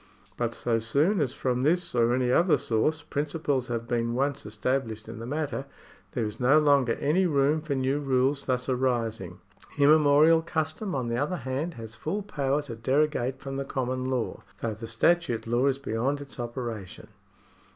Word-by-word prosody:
But 115 -1 -2
so 115 -2 0
soon 145 - +2
as 135 -4 0
from 125 -3 -1
this 175 +6 +1
or 120 0 +3
any 125 -1 +1
other 170 +5 +4
source 120 +8 0
principles 145 -3 -1
have 115 -1 -3
been 120 0 0
once 140 -3 -1
established 110 0 -2
in 115 0 -8
the 115 - -6
matter, 145 -1 -3 0.5
there 120 -4 -1
is 105 +1 -6
no 130 +4 +5
longer 140 -5 +4
any 175 +6 +1
room 145 0 +2
for 150 -2 -2
new 135 +2 0
rules 135 0 +1
thus 125 -1 0
arising. 115 -8 -1 0.4
Immemorial 150 +2 +6
custom, 160 +3 -3
on 125 -3 -1
the 115 0 -1
other 150 +8 -1
hand, 135 +6 -3
has 115 -1 -9
full 165 - -3
power 145 -6 -1
to 125 -5 -7
derogate 130 +1 +1
from 135 -1 -5
the 140 - -1
common 130 -1 -2
law, 130 -3 -2 0.2
though 115 -2 -1
the 115 +2 -8
statute 145 -7 +1
law 120 +4 +2
is 135 -1 +1
beyond 135 +2 -1
its 140 -2 -11
operation. 120 -5 -5
130 Hz, 175 wpm, -27 LUFS, 120-145 Hz, 0.5 s, Immemorial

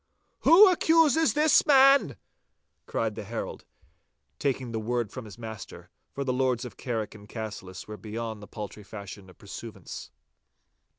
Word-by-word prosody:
'Who 390 +6 +8
accuses 325 -3 +4
this 305 +1 +5
man?' 275 - +5 0.7
cried 110 -1 -1
the 105 - -6
herald, 115 +3 -6 0.7
taking 130 -3 -1
the 110 - -2
word 120 -1 -2
from 130 -3 -7
his 105 0 -11
master, 110 -4 -9 0.2
for 140 - -4
the 130 -2 -1
Lords 125 -1 0
of 115 -5 -9
Carrick 115 -4 -3
and 105 -1 -14
Cassillis 100 -5 -7
were 105 0 -7
beyond 110 0 -5
the 105 - -10
paltry 105 -1 -8
fashion 100 -1 -10
of 90 - -17
pursuivants. - - -9
115 Hz, 145 wpm, -27 LUFS, 105-140 Hz, 0.7 s, Who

